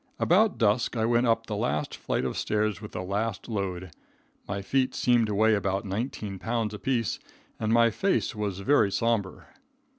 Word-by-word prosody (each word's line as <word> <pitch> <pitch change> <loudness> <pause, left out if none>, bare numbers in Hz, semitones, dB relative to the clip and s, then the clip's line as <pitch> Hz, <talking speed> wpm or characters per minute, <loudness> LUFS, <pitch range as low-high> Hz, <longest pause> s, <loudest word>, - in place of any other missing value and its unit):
About 205 +5 +3
dusk 115 +2 +1
I 110 - +1
went 120 +1 +2
up 115 0 +2
the 105 - -4
last 100 -9 -1
flight - - -2
of - - -2
stairs 105 -1 -1
with 105 - -9
the 90 - -4
last 100 +2 -2
load. 95 -5 -3 0.6
My 100 0 -3
feet 130 +4 0
seemed 120 -2 +3
to 105 - -2
weigh 110 +2 +4
about 100 -1 -1
nineteen 100 -1 -4
pounds 115 -1 -2
apiece 115 0 -1 0.4
and 110 -1 -1
my 115 0 +5
face 190 - 0
was 100 -3 -3
very 105 -2 +3
sombre. 105 -1 -1
110 Hz, 175 wpm, -27 LUFS, 100-115 Hz, 0.6 s, my